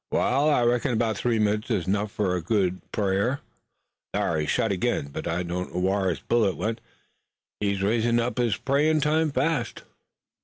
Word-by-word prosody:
"Wa'al, 140 +4 +2
I 145 -5 +3
reckon 120 +1 +1
'bout 110 -1 +1
three 115 +2 0
minutes 105 +3 0
is 100 -7 -1
'nough 100 +2 0
fur 100 -3 -1
a - - +1
right 85 - -5
good 95 -3 0
prayer. 100 +6 0 0.7
Thar, 80 - 0
he's 75 -1 -2
shot 110 - +1
ag'in, 95 -6 -1
but - - -6
I 85 +2 -1
don't 90 +1 -4
know - - 0
whar 95 +1 +1
his 85 - -3
bullet 110 -5 +1
went. 110 +1 -2 0.8
He's 100 -2 -1
usin' 115 +3 +2
up 120 +2 -1
his 115 -6 +1
prayin' 150 +3 +2
time 155 +2 +2
fast." 140 -3 -1
110 Hz, 185 wpm, -25 LUFS, 95-125 Hz, 0.8 s, I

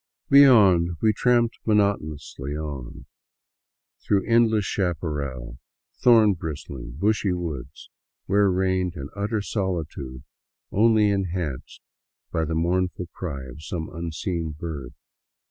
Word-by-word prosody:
Beyond, 100 -12 +6
we 110 -1 +3
tramped 120 +1 +2
monotonously 75 -9 -1
on 70 -5 -7 1.0
through 100 -2 +1
endless 115 -2 +3
chaparral, 75 -10 -3 0.4
thorn 110 -4 +6
bristling, 70 -7 -7
bushy 100 +1 +1
woods 75 -7 -6 0.3
where 100 +1 +3
reigned 95 -1 0
an 70 -2 -6
utter 105 +1 -2
solitude 80 - -4 0.5
only 110 -1 +4
enhanced 90 -8 -3 0.5
by 80 - 0
the 80 +1 -2
mournful 90 +1 -1
cry 70 -7 -5
of 65 +4 -10
some 80 0 -5
unseen 85 -1 -4
bird. 75 -7 -6
90 Hz, 105 wpm, -24 LUFS, 75-100 Hz, 1.0 s, Beyond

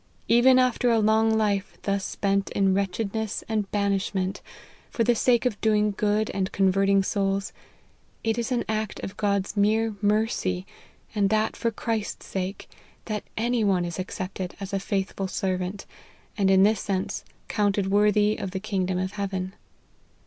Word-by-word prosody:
Even 255 +2 +6
after 250 -1 +3
a 230 - +4
long 220 +1 +3
life 205 -2 0
thus 200 -1 0
spent 200 0 0
in 195 -1 +3
wretchedness 200 +2 -2
and 215 -3 -1
banishment, 200 -1 -1 0.5
for 230 - 0
the 240 - +4
sake 240 +1 +2
of 220 -5 -1
doing 210 -1 +2
good 210 +1 +1
and 190 -1 -2
convert 195 0 +2
ing 195 -1 +4
souls, 195 -1 -1 0.7
it 225 +1 0
is 235 +3 -2
an 245 -1 +1
act 215 -1 -2
of 195 - -6
God's 200 -1 0
mere 215 +2 +2
mercy, 205 -3 0 0.5
and 205 -3 +2
that 215 +1 +1
for 230 - 0
Christ's 220 -1 -3
sake, 190 +1 -4 0.4
that 210 -2 -3
any 235 +1 +1
one 190 -4 +2
is 170 +1 -5
accepted 185 0 -5
as 200 0 -6
a 195 - +1
faithful 195 0 -2
servant, 185 +1 -2 0.5
and 195 -2 +2
in 190 0 +6
this 210 0 +3
sense, 190 -2 -2 0.2
counted 200 -2 +1
worthy 210 +1 +3
of 195 - -4
the 190 +1 -4
kingdom 190 -3 -1
of 185 +1 -2
heaven. 190 -2 -3
200 Hz, 160 wpm, -26 LUFS, 195-220 Hz, 0.7 s, Even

